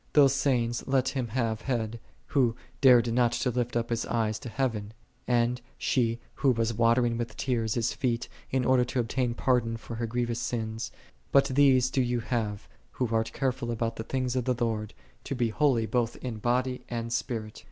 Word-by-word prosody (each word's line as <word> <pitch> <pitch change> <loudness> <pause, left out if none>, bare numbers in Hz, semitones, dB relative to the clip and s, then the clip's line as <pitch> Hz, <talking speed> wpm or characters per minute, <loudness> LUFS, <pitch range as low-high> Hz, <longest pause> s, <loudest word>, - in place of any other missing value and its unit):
*7 - - -39
Those 140 -3 +6
sayings 120 -4 0
let 130 -1 +2
him 130 -4 -2
have 115 -1 -1
had, 115 -3 -2 0.3
who 125 -6 +2 0.3
dared 120 -4 +6
not 120 -1 +3
to 125 - 0
lift 120 0 -1
up 115 0 -2
his 115 - 0
eyes 110 -2 0
to 120 - -7
heaven; 110 -5 -2 0.3
and 120 0 +2 0.2
she 115 -2 +1 0.2
who 140 - +3
was 115 -2 +1
watering 115 +1 +2
with 115 -2 -4
tears 115 -5 0
His 120 0 0
feet, 120 -3 -1 0.2
in 130 -1 0
order 130 -1 +4
to 125 +1 -2
obtain 120 0 0
pardon 120 -3 +1
for 115 0 -8
her 115 0 -2
grievous! 120 0 -1
sins; 115 -2 -3 0.4
but 140 0 +6
these 130 -2 +5
do 130 - +2
thou 120 -1 -1
have, 110 -4 -2 0.3
who 125 -3 -1
art 115 0 +1
careful 130 -3 -1
I - - 0
about 115 0 -2
the 110 - -3
things 130 0 -2
of 125 -2 0
the 125 - +1
Lord, 110 -3 -2 0.3
to 140 - -4
be 120 -2 +1
holy 125 -2 +2
both 120 0 0
in 120 -4 -5
body 125 +2 0
and 115 -1 -3
spirit. 115 -3 -3
120 Hz, 195 wpm, -28 LUFS, 115-125 Hz, 0.4 s, Those